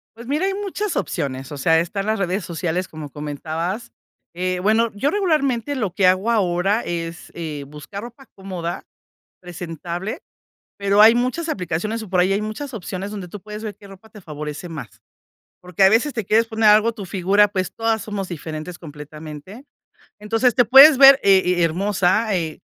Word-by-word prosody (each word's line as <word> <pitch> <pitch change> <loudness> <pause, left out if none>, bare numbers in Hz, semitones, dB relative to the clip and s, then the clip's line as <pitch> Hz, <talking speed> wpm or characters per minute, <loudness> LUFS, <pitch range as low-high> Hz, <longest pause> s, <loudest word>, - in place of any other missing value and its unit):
Pues 235 +1 -11
mira, 300 +7 0
hay 390 - 0
muchas 410 0 -3
opciones, 135 -7 -3
o - - -6
sea, 160 +4 +3
están 195 +4 -3
las 215 0 -1
redes 195 +1 -1
sociales, 175 +1 -3
como 155 -2 -8
comentabas, 160 - -5 0.4
eh, 180 +1 -2
bueno, 220 +3 +2
yo 235 +8 0
regularmente 290 - 0
lo 215 -8 -2
que 195 - +1
hago 185 +4 +3
ahora 195 0 +1
es, 165 -3 -6
eh, 155 -4 -6
buscar 150 +8 -9
ropa 240 +3 -12
cómoda, 185 -3 -5 0.6
presentable, 175 - -6 0.6
pero 200 0 +2
hay 220 +2 +8
muchas 255 +8 -1
aplicaciones, 200 - -3
o, 215 - -10
por 185 - 0
ahí 185 +2 +2
hay 200 +2 0
muchas 225 +5 -6
opciones 195 0 -6
donde 195 -4 -7
tú 205 +4 -9
puedes 210 +2 -9
ver 210 -3 -6
qué 205 - -15
ropa 195 +2 -15
te 210 - -13
favorece 150 0 -7
más. 160 -3 -9 0.6
Porque 180 +1 -3
a - - +8
veces 230 +8 +2
te 225 -4 -3
quieres 225 +4 +3
poner 220 -1 +2
algo 215 +2 +5
tu 210 -4 -8
figura, 195 +3 +3
pues, 185 -2 -3
todas 225 -1 -1
somos 200 -3 -5
diferentes 160 +1 -7
completamente. 155 - -10 0.5
Entonces 225 +3 +1
te 245 - +4
puedes 270 +4 +9
ver, 270 0 +9
he 195 -1 +6 0.2
he - - +3
hermosa, 195 +4 +1
e 165 -4 -3
195 Hz, 180 wpm, -21 LUFS, 170-225 Hz, 0.6 s, puedes